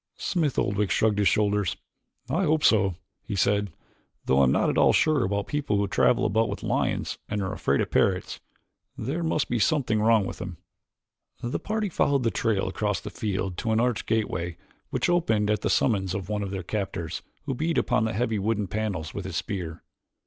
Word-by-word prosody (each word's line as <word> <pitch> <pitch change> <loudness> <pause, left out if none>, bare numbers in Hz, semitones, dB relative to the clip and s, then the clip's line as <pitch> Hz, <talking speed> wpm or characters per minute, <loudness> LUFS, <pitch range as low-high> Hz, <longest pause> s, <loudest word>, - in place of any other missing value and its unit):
Smith 155 -8 -1
Oldwick 100 0 +1
shrugged 105 -2 +2
his 100 - +4
shoulders. 105 -3 +1 0.5
"I 165 +9 +1
hope 155 -1 +2
so," 100 -5 +4 0.3
he - - -5
said, 100 +1 +1 0.5
"though 65 - +3
I 70 - +6
am 65 - +3
not - - +2
at - - -3
all - - +5
sure 155 -5 +3
about 100 +1 -1
people 145 -8 -1
who 100 0 +1
travel 120 +4 +3
about 110 +2 +2
with - - -5
lions - - -1
and 105 - -1
are 95 -1 -2
afraid - - +1
of - - -3
parrots. 95 -2 +1 0.6
There 155 +6 -2
must 160 -2 0
be 120 - -1
something 120 -6 +2
wrong 110 -2 +4
with - - -6
them." 90 -2 -6 0.9
The 120 - -2
party 215 0 -1
followed 140 -5 +1
the 115 - +2
trail 105 -1 0
across 105 +1 -1
the - - -8
field 95 -3 -3
to 115 - -1
an 110 - +3
arched 120 -2 0
gateway 90 -6 -1 0.3
which - - 0
opened 110 -13 +2
at 105 - 0
the - - 0
summons 95 -6 +1
of 95 -1 -5
one 105 -1 -1
of 100 - -3
their 95 -1 -4
captors, 95 -4 -3 0.2
who 140 - -1
beat 160 +6 -1
upon 110 - +2
the 110 - -1
heavy 115 -1 0
wooden 105 +1 0
panels 95 -6 -3
with 100 - -5
his 95 -3 -5
spear. 85 -4 -4
105 Hz, 200 wpm, -26 LUFS, 95-120 Hz, 0.9 s, I